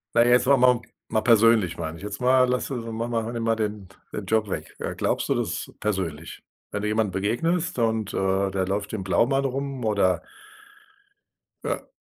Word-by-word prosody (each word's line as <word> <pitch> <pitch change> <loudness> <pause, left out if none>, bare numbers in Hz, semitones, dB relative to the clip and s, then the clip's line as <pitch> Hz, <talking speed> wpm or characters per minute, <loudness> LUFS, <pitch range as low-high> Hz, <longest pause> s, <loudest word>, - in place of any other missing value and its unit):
Na, 115 - +6
jetzt 120 +1 +5
wollen 140 -1 +5
wir 125 0 +6
mal, 120 - -5 0.3
mal 110 - +1
persönlich, 110 -4 +4
meine 80 +1 -4
ich 85 - -13
jetzt 105 0 -6
mal 130 0 +4
Lass 125 0 0
ma 115 -3 -3
mal 115 -1 -2
nimm 115 -1 -3
mal 115 0 +3
den, 105 -3 -3 0.2
den 105 - -4
Job 110 +1 +1
weg. - - -5
Äh, - - -3
glaubst - - 0
du - - +2
das - - -3
persönlich, 85 -7 -3 0.3
wenn 100 - -3
du 105 - -1
jemanden 105 -2 +1
begegnest 130 - 0
und, 110 -3 0
äh, 95 0 +1
der 95 -1 -1
läuft 100 +2 -2
im 105 -4 -3
Blaumann 135 +8 +2
rum, 135 -1 -3
oder? 95 -5 +2 1.4
Ja. - - -3
110 Hz, 190 wpm, -25 LUFS, 100-120 Hz, 1.4 s, Na